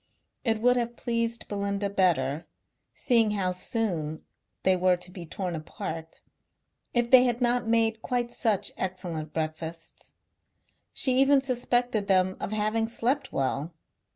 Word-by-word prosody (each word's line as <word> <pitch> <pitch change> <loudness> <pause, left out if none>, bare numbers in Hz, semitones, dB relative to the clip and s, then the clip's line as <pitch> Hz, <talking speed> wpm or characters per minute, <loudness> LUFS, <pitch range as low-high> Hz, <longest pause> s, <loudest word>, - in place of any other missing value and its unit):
It 225 -3 +1
would 250 +1 +4
have 240 0 -2
pleased 230 -1 -2
Belinda 200 0 -2
better, 165 -7 +1 0.5
seeing 230 -4 +3
how 185 -2 0
soon 180 -6 -2 0.4
they 190 - +4
were 180 0 +3
to 180 +1 -11
be 175 -2 -9
torn 180 +1 -4
apart, 160 +1 -7 0.7
if 240 0 0
they 255 -1 +8
had 240 -1 0
not 245 -1 +1
made 225 -1 +2
quite 245 -1 -1
such 215 -5 +1
excellent 175 -4 -4
breakfasts. 160 +1 -6 0.8
She 260 -1 +3
even 275 +1 +5
suspected 245 -4 0
them 185 -1 +3
of - - -4
having 215 +1 0
slept 255 +4 -1
well. 140 +4 -2
210 Hz, 135 wpm, -27 LUFS, 175-240 Hz, 0.8 s, they